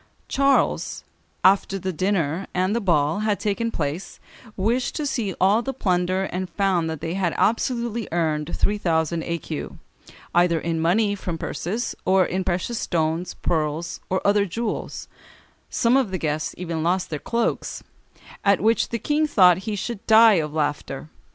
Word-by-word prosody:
Charles, 275 0 +1 0.4
"after 195 0 +4
the 190 0 -3
dinner 180 -1 0
and 185 +4 +1
the 235 - 0
ball 165 -3 +2
had 215 -1 0
taken 215 +2 -1
place, 155 -2 -4 0.4
wished 235 +6 0
to 305 - -2
see 220 -9 -2
all 200 +5 +4
the 270 +1 -4
plunder, 185 -3 +1
and 185 -1 -3
found 180 -3 +1
that 160 -2 -5
they 165 - -3
had 185 -3 -1
absolutely 235 -1 0
earned 155 -3 -1
three 210 0 +1
thousand 165 -2 0
écus, 165 -2 -4 0.6
either 175 -1 +3
in 165 0 -2
money 200 +5 +2
from 180 -4 -4
purses, 210 +9 -3
or 190 -1 +4
in 185 +2 -2
precious 185 +6 -2
stones, 165 +1 -1
pearls, 160 +1 -1
or 185 - -1
other 200 0 +3
jewels; 220 +4 -4 0.6
some 235 +1 +2
of 265 -6 +2
the 185 - -2
guests 155 -2 -2
even 170 -3 -3
lost 180 +2 0
their 150 - -2
cloaks, 235 +7 -2 0.6
at 200 -1 +4
which 225 +3 +2
the 235 - -2
King 300 +6 +1
thought 180 - +6
he 210 - -1
should 205 +1 -5
die 220 -3 +7
of 150 -1 -4
laughter." 145 -1 -3
185 Hz, 160 wpm, -23 LUFS, 165-215 Hz, 0.6 s, die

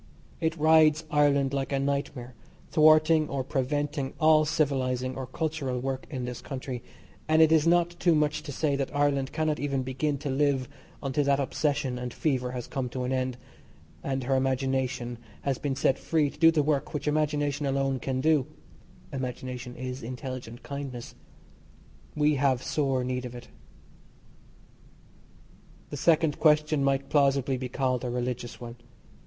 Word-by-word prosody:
It 160 0 -1
rides 155 0 +5
Ireland 140 -2 +3
like 135 -1 -2
a 140 - +1
nightmare, 135 -2 -2 0.4
thwarting 155 0 +5
or 135 -1 -2
preventing 140 +1 -2
all 155 -1 +5
civilising 130 -4 0
or 130 -1 -5
cultural 140 -2 -2
work 130 +1 -4
in 130 -5 -4
this 125 -1 -6
country, 130 -3 -5 0.5
and 155 0 +3
it 160 -1 +6
is 160 0 +4
not 175 0 +4
too 170 -2 +4
much 150 0 +1
to 150 -1 -7
say 145 +1 0
that 140 +1 -3
Ireland 140 -2 +1
cannot 155 -1 -1
even 140 -2 -1
begin 135 +3 -1
to 140 +1 -5
live 135 -2 +1 0.4
until 140 +1 0
that 140 0 +3
obsession 140 -2 -1
and 125 0 -4
fever 130 -5 0
has 125 -2 -4
come 130 -2 -3
to 125 +1 -4
an 125 - -2
end, 130 -1 -1 0.7
and 135 -1 -2
her 135 +2 +1
imagination 130 -2 -1 0.2
has 135 -2 -1
been 140 -2 -2
set 135 0 +1
free 155 -3 +1
to - - -18
do 165 0 +7
the 160 -2 +2
work 145 0 -1
which 145 0 -3
imagination 145 -1 0
alone 135 -1 0
can 130 +1 -2
do 155 -3 +3 0.7
Imagination 125 -1 -5
is 130 +1 -5
intelligent 125 -1 -7
kindness 140 -4 -6 1.0
we 150 -1 +2
have 130 -2 +2
sore 135 -4 0
need 125 0 -2
of 125 0 -7
it. 120 0 -10 2.4
The 145 - -4
second 160 0 +2
question 150 -2 +3
might 135 0 0
plausibly 140 -2 +2
be 125 0 -5
called 130 -1 -1
a 125 - -2
religious 120 0 -3
one. 120 0 -8
135 Hz, 160 wpm, -28 LUFS, 130-150 Hz, 2.4 s, do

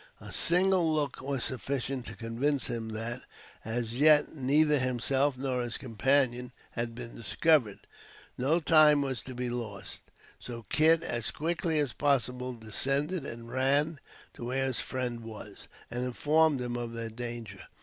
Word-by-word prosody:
A - - -10
single 180 -1 +3
look 150 -4 -1
was 135 -1 -2
sufficient 130 -1 -2
to - - -7
convince 125 +4 -1
him 115 -1 -3
that, 115 +3 -4 0.4
as 115 0 -2
yet, 150 +3 +5
neither 150 +2 +3
himself 130 +2 +1
nor 130 -1 -1
his 120 -2 -2
companion 125 0 +1 0.2
had 115 -1 -4
been 120 -1 -8
discovered. 115 - +2 0.6
No 145 +7 +2
time 155 -3 +5
was 130 -4 -2
to 130 - -9
be 125 0 -2
lost, 110 -5 -5 0.4
so 120 -2 -7
Kit, 160 +1 +5
as 120 -6 -2
quickly 165 0 -1
as 145 -5 +1
possible, 125 -3 0
descended 135 - -2
and 115 0 -8
ran 140 +4 +1 0.3
to 120 - -8
where 135 +2 -1
his 130 -2 0
friend 125 -2 -2
was, 110 -3 -10 0.2
and 120 +1 -2
informed 150 +3 +2
him 120 -1 -3
of 120 -1 -4
their 115 -1 -5
danger. 115 -3 -7
130 Hz, 150 wpm, -30 LUFS, 120-145 Hz, 0.6 s, yet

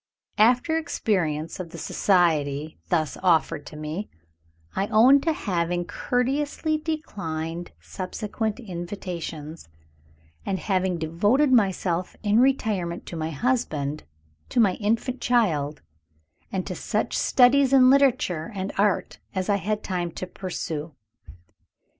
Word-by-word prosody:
After 250 +9 +4
experience 165 - -1
of 180 -2 -5
the - - -9
society 155 -5 +1
thus 160 -4 0
offered 160 -4 +2
to - - -10
me, 155 +7 -5 0.7
I 195 - 0
own 245 +6 +6
to 325 - +1
having 175 - -1
courteously 285 - -1
declined 175 - -4
subsequent 210 +4 -4
invitations, 170 - -6 0.7
and 195 - -1
having 185 -2 0
devoted 205 - +2
myself 185 -5 +1
in 210 +1 +3
retirement 210 -10 +1
to - - -7
my 160 -1 -2
husband, 155 - -1 0.5
to - - 0
my 205 -5 +5
infant 230 +4 -1
child, 160 -12 +1 0.7
and 185 -2 -2
to - - -4
such - - -2
studies 265 +1 +4
in 260 -1 +7
literature 235 - +2
and 190 +1 -3
art 205 -1 +1 0.2
as 185 +1 -2
I 200 - +3
had 210 +2 -2
time 180 -2 -2
to - - -5
pursue. 165 -5 -5
190 Hz, 120 wpm, -25 LUFS, 165-240 Hz, 0.7 s, in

